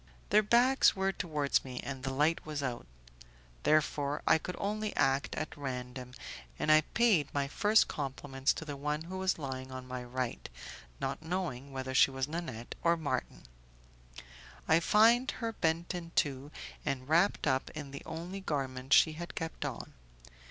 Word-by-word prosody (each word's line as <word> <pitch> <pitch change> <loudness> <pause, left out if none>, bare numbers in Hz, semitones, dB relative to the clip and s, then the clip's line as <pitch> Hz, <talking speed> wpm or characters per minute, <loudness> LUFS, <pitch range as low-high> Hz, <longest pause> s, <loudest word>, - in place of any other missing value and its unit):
Their 210 +2 +7
backs 240 +5 +4
were 190 0 +1
towards 150 -7 0
me, 130 -2 -6
and 135 -2 -5
the 135 +1 -2
light 150 +5 +2
was 150 -2 -4
out; 120 - -4 0.7
therefore 150 -1 +1
I - - +5
could 180 +3 -5
only 210 +1 -2
act 135 +1 +1
at 155 - -4
random, 125 -3 -6 0.4
and 155 - +2
I 155 0 +7
paid 195 - +2
my 140 -1 +1
first 210 +9 +4
compliments 135 -1 -1
to 160 - -7
the 145 -2 -5
one 150 +2 -2
who 185 +3 -6
was 190 0 +1
lying 130 -3 -5
on 130 0 -7
my 125 -1 -5
right, 125 0 -4 0.5
not - - -3
knowing 160 -6 -3
whether 130 0 -4
she 130 - +6
was 135 0 -2
Nanette 150 -8 -5
or 170 0 +3
Marton. 140 -5 -3 1.2
I 160 +1 +5
find 230 +8 +5
her 230 -5 -3
bent 165 -2 0
in 170 -2 -6
two, 140 0 0 0.3
and 130 -1 -2
wrapped 170 +6 +3
up 130 -2 +1
in 145 -3 -6
the 140 - -7
only 170 +4 -6
garment 135 -6 -2
she 160 - +7
had 170 +2 -7
kept 165 -1 -4
on. - - -5
150 Hz, 165 wpm, -32 LUFS, 135-175 Hz, 1.2 s, Their